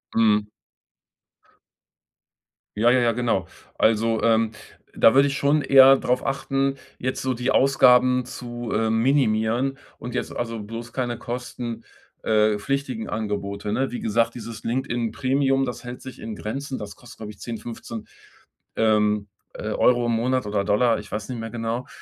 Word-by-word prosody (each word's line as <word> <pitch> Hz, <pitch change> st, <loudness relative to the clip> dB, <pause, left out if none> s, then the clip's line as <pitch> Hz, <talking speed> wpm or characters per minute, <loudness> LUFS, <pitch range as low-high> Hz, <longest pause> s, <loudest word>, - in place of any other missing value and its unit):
Mhm. 105 Hz, -2 st, +3 dB, 2.3 s
Ja, 115 Hz, +3 st, +4 dB
ja, 130 Hz, -, +4 dB
ja, 120 Hz, -1 st, +3 dB
genau. 115 Hz, -7 st, 0 dB, 0.3 s
Also, 115 Hz, 0 st, +2 dB
ähm, 115 Hz, -1 st, +3 dB, 0.4 s
da 115 Hz, -, +5 dB
würde 140 Hz, +1 st, +6 dB
ich 140 Hz, -, -2 dB
schon 145 Hz, +2 st, +2 dB
eher 135 Hz, 0 st, +8 dB
darauf 125 Hz, +1 st, 0 dB
achten, 135 Hz, 0 st, 0 dB, 0.2 s
jetzt 130 Hz, +1 st, -3 dB
so 130 Hz, -1 st, 0 dB
die 125 Hz, +2 st, -2 dB
Ausgaben 125 Hz, -2 st, +4 dB
zu, 120 Hz, -2 st, -7 dB
äh, 110 Hz, +1 st, +1 dB
minimieren. 120 Hz, +1 st, +1 dB, 0.2 s
Und 120 Hz, +1 st, -7 dB
jetzt, 125 Hz, -, -3 dB
also, 115 Hz, -2 st, -3 dB
bloß 115 Hz, +3 st, -8 dB
keine 120 Hz, -2 st, -2 dB
kosten 120 Hz, -1 st, -6 dB, 0.4 s
äh, 105 Hz, -1 st, +2 dB
pflichtigen 135 Hz, -2 st, -3 dB
Angebote, 105 Hz, -1 st, -3 dB
ne? 135 Hz, +3 st, 0 dB
Wie 125 Hz, -, -4 dB
gesagt, 115 Hz, +2 st, 0 dB
dieses 115 Hz, -1 st, -8 dB
LinkedIn-Premium, 130 Hz, +3 st, 0 dB
das 125 Hz, -1 st, -6 dB
hält 125 Hz, 0 st, -8 dB
sich 130 Hz, -, -10 dB
in 110 Hz, -2 st, -6 dB
Grenzen. 135 Hz, +6 st, -5 dB
Das 100 Hz, -3 st, -8 dB
kostet, 125 Hz, -, -15 dB
glaube 105 Hz, -1 st, -7 dB
ich 100 Hz, -, -17 dB
10, 115 Hz, -2 st, -5 dB
15, 115 Hz, -1 st, -8 dB, 0.7 s
ähm, 105 Hz, -2 st, +2 dB, 0.3 s
äh, 110 Hz, -, -5 dB
Euro 120 Hz, +1 st, +3 dB
im -, -, +1 dB
Monat 125 Hz, +1 st, 0 dB
oder 105 Hz, -1 st, -1 dB
Dollar, 110 Hz, +3 st, +2 dB
ich 105 Hz, -, -11 dB
weiß 105 Hz, +2 st, -4 dB
nicht 125 Hz, -2 st, -4 dB
mehr 115 Hz, 0 st, -5 dB
genau. 115 Hz, +2 st, -3 dB
120 Hz, 160 wpm, -24 LUFS, 110-130 Hz, 2.3 s, eher